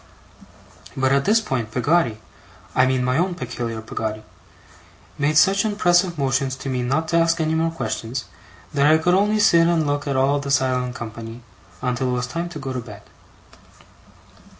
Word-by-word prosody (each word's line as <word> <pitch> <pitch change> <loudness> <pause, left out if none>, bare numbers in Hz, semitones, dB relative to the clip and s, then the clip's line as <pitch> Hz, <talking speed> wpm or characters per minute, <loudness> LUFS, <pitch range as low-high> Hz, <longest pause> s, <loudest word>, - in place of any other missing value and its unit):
But 130 0 +2
at 140 0 +2
this 220 +2 +4
point 125 - -3
Peggotty 125 -1 +1 0.5
I 130 - +4
mean 130 -1 +1
my 125 +4 +1
own 180 0 0
peculiar 120 -5 -5
Peggotty 110 -1 -4 1.0
made 150 +2 +2
such 195 +6 +4
impressive 180 -4 +2
motions 135 -1 0
to 135 +1 -6
me 130 -1 -1
not 135 +6 -1
to 170 - +2
ask 165 0 +2
any 160 0 0
more 165 +1 +1
questions, 130 -6 -4 0.5
that 140 0 +3
I 155 +1 +6
could 175 +3 +1
only 205 +3 +3
sit 170 -5 +5
and 165 -2 +2
look 145 0 -2
at 140 -2 0
all 140 +2 +2
the 140 0 -5
silent 130 -2 0
company, 115 0 -8 0.4
until 125 +1 -1
it - - 0
was 125 0 -1
time 170 +7 -4
to 170 - -8
go 135 -3 -5
to 130 - -3
bed. 115 - -11
140 Hz, 175 wpm, -22 LUFS, 125-165 Hz, 1.0 s, I